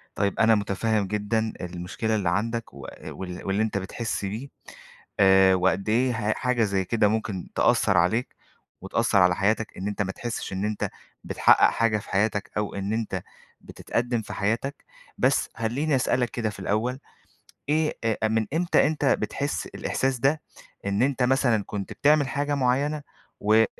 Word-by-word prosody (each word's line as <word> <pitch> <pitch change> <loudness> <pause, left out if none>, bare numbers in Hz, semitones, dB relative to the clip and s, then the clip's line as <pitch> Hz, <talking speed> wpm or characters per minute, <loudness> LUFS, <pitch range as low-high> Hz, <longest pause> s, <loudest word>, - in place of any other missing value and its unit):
طَيِّب 100 -1 0
أنا 110 0 +5
مُتفهِّم 105 0 0
جدًا 110 +2 -1
المشكلة 90 +5 -3
اللّي 95 -4 0
عندك 115 +5 -2
و 70 - -9 0.2
وال 90 -1 -7
واللّي 100 +3 +1
أنت 110 -2 -1
بتحِسّ 100 +2 -3
بيه، 110 +8 -5 0.7
آآ 95 -1 +6
وقد 95 +3 +1
إيه 125 +3 +3 0.2
ه - - +3
حاجة 125 -3 0
زيّ 95 -2 0
كِدَه 110 -1 +2
ممكن 110 -3 -2
تأثّر 100 - +3
عليك، 90 +9 +1 0.5
وتأثّر 100 +2 +1
على 90 -1 +5
حياتَك 105 +2 0
إن 95 +2 -4
أنت 105 0 -2
ما 95 - -1
تحِسّش 120 -2 -5
إن 95 +2 -2
أنت 105 -1 -2 0.3
بتحقّق - - +5
حاجة 115 -2 +1
في 105 - -9
حياتك، 105 +1 0
أو 105 -1 -2
إن 100 +2 -2
أنت 115 -1 -2 0.4
بتتقدّم 120 -1 -2
في - - -8
حياتَك، 115 +8 -2 0.3
بس - - +2
خلّيني 135 +6 0
أسألَك 125 -1 +1
كده 115 -3 -2
في 100 - -10
الأول، 115 +7 -1 0.7
إيه 155 0 +1
أ 110 -1 +1
من 110 0 +1
إمتى 170 -2 +3
أنت 150 -2 -1
بتحِسّ 140 +1 0
الإحساس 130 -2 -2
ده؟ 145 +4 +2 0.4
إن 100 +3 0
أنت 130 -1 +1
مثلًا 125 -5 +2
كنت 100 -2 -5
بتعمل 145 -1 +3
حاجة 145 +1 -1
معيّنة، 140 +3 +1 0.4
و 105 +1 +2
آآ، 110 0 +6
110 Hz, 165 wpm, -25 LUFS, 100-125 Hz, 0.7 s, آآ